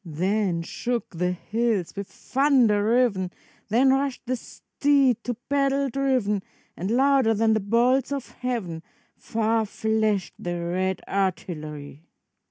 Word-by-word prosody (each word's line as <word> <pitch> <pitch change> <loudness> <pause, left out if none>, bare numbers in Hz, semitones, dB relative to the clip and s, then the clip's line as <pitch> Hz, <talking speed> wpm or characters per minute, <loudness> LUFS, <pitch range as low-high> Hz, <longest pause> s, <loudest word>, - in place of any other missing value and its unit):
Then 180 +1 -1
shook 240 +7 -3
the 180 +2 0
hills 215 0 -1
with 200 -1 -5
thunder 255 -7 +2
riven. 220 -5 +2 0.4
Then 255 +5 +4
rushed 270 -1 -1
the 255 +1 0
steed 270 -1 +1
to 245 - -2
battle 275 0 +1
driven, 255 -7 +1 0.3
And 185 +4 -4
louder 260 -1 +3
than 220 +1 +3
the 220 - +2
bolts 240 +7 +2
of 275 -3 -4
heaven 225 -10 -3 0.3
Far 225 0 0
flashed 215 -2 0
the 175 0 -3
red 185 +2 -1
artillery. 155 -6 -3
220 Hz, 125 wpm, -25 LUFS, 185-255 Hz, 0.4 s, Then